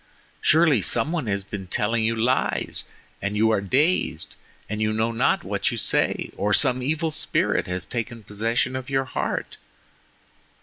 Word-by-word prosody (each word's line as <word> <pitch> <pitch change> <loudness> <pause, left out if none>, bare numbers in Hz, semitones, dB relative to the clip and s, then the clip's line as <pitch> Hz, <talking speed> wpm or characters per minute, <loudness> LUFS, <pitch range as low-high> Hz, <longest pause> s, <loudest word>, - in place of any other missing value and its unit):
Surely 155 -7 +4
some 120 - +1
one 160 -8 -2
has 100 -1 -1
been 95 -1 -7
telling 110 +5 0
you 115 +1 +1
lies, 120 +4 0 0.4
and 100 +1 -2
you 110 +1 +4
are 110 - +2
dazed, 130 - +1 0.3
and 110 +1 -4
you 110 0 +1
know 110 +1 0
not 115 - +1
what - - -1
you - - -4
say—or 105 0 +1
some 125 0 +4
evil 155 +4 -1
spirit 150 -1 0
has 90 0 -3
taken 115 -1 -5
possession 115 +5 -1
of 130 +1 -5
YOUR 135 -1 +1
heart. - - -3
115 Hz, 160 wpm, -24 LUFS, 105-130 Hz, 0.4 s, Surely